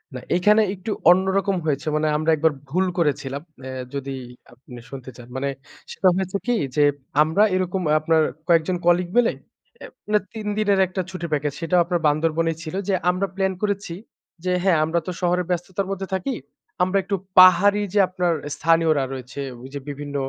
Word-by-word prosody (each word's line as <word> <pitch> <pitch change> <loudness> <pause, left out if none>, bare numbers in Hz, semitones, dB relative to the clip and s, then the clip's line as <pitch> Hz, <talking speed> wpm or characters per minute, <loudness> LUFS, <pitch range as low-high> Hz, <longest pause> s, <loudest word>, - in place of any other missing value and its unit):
না, 125 - -4 0.2
এখানে 210 +5 +4
একটু 190 +4 -6 0.2
অন্যরকম 190 +2 +2
হয়েছে। 150 0 -1
মানে 155 0 +1
আমরা 155 +1 +1
একবার 160 +1 +2 0.2
ভুল 185 +6 +1
করেছিলাম। 145 -4 -1 0.2
এ্যা 130 -1 -5
যদি 140 0 -4 0.4
আপনি 125 0 -13
শুনতে 130 -2 -8
চান। 120 -1 -12
মানে 140 +1 -1 0.4
সেটা 190 - +1
হয়েছে 190 +1 -1
কি? 245 - +3 0.2
যে, 150 - +4 0.4
আমরা 160 +7 +2
এরকম 185 0 -1 0.2
আপনার 160 0 +2 0.3
কয়েকজন 170 +1 +3
কলিগ 175 +1 +3
মিলে 245 -1 +4 0.5
আ - - -6 0.2
মানে 210 0 +3
৩ 215 -2 -6
দিনের 205 -2 +2
একটা 185 +1 -3
ছুটি 180 -2 -6
প্যাকেজ 150 -1 0
সেটাও 170 +2 +2
আপনার 175 0 -1
বান্দরবনেই 160 +2 +1
ছিল। 160 +1 -6
যে 200 - +1 0.2
আমরা 185 +2 0
প্লান 190 -1 0
করেছি 200 -4 -2 0.5
যে 185 - 0
হ্যা 190 -2 +4
আমরা 160 +2 0
তো - - -1
শহরে 180 0 +1
ব্যস্ততার 180 +2 -2
মধ্যে 195 0 -4
থাকি। 220 +8 -2 0.5
আমরা 185 +2 +1
একটু 195 +2 -1 0.2
পাহাড়ি 185 +3 +7
যে 210 - +3
আপনার 180 -2 0 0.2
স্থানীয়রা 165 -3 +2
রয়েছে। 130 +1 -7 0.2
ওই 130 - -10
যে 140 - -4
বিভিন্ন 145 0 -6
175 Hz, 175 wpm, -22 LUFS, 150-190 Hz, 0.5 s, পাহাড়ি